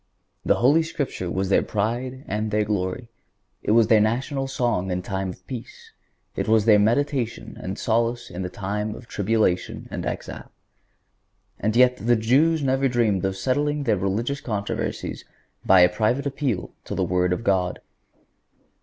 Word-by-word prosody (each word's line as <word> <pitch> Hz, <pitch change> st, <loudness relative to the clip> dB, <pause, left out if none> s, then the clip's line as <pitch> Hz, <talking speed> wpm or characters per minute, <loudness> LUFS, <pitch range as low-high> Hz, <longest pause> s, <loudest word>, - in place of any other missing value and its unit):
The -, -, +3 dB
Holy 145 Hz, +7 st, +4 dB
Scripture 140 Hz, -, -3 dB
was 95 Hz, +1 st, -1 dB
their 100 Hz, -, +4 dB
pride 120 Hz, +5 st, -2 dB
and 105 Hz, +1 st, -2 dB
their 105 Hz, 0 st, +1 dB
glory. 100 Hz, +2 st, -2 dB, 0.5 s
It -, -, -5 dB
was 115 Hz, 0 st, +6 dB
their 110 Hz, 0 st, +5 dB
national 135 Hz, +5 st, 0 dB
song 120 Hz, -8 st, -1 dB
in 90 Hz, 0 st, -2 dB
time 95 Hz, +1 st, -3 dB
of 90 Hz, 0 st, -10 dB
peace; 120 Hz, 0 st, -9 dB, 0.4 s
it -, -, -2 dB
was 110 Hz, -1 st, +3 dB
their 105 Hz, -2 st, +6 dB
meditation 120 Hz, +2 st, 0 dB
and 95 Hz, -, -5 dB
solace 115 Hz, +1 st, 0 dB
in 90 Hz, +1 st, -5 dB
time 105 Hz, +3 st, -3 dB
of 120 Hz, -, -12 dB
tribulation 105 Hz, -4 st, 0 dB
and -, -, -4 dB
exile. -, -, -6 dB, 1.1 s
And 110 Hz, +2 st, 0 dB
yet 125 Hz, 0 st, +5 dB
the 120 Hz, +1 st, +2 dB
Jews 140 Hz, +8 st, +3 dB
never 135 Hz, 0 st, +2 dB
dreamed 115 Hz, -7 st, +1 dB
of 95 Hz, 0 st, -2 dB
settling 145 Hz, +8 st, 0 dB
their 115 Hz, -6 st, +2 dB
religious 110 Hz, +9 st, -2 dB
controversies 100 Hz, -4 st, -3 dB, 0.4 s
by 95 Hz, -1 st, +6 dB
a 90 Hz, -, +8 dB
private 110 Hz, +9 st, 0 dB
appeal 130 Hz, -9 st, -2 dB
to -, -, -4 dB
the -, -, 0 dB
Word 90 Hz, 0 st, +1 dB
of 90 Hz, +6 st, -1 dB
God. 95 Hz, -4 st, +1 dB
110 Hz, 160 wpm, -24 LUFS, 95-125 Hz, 1.1 s, a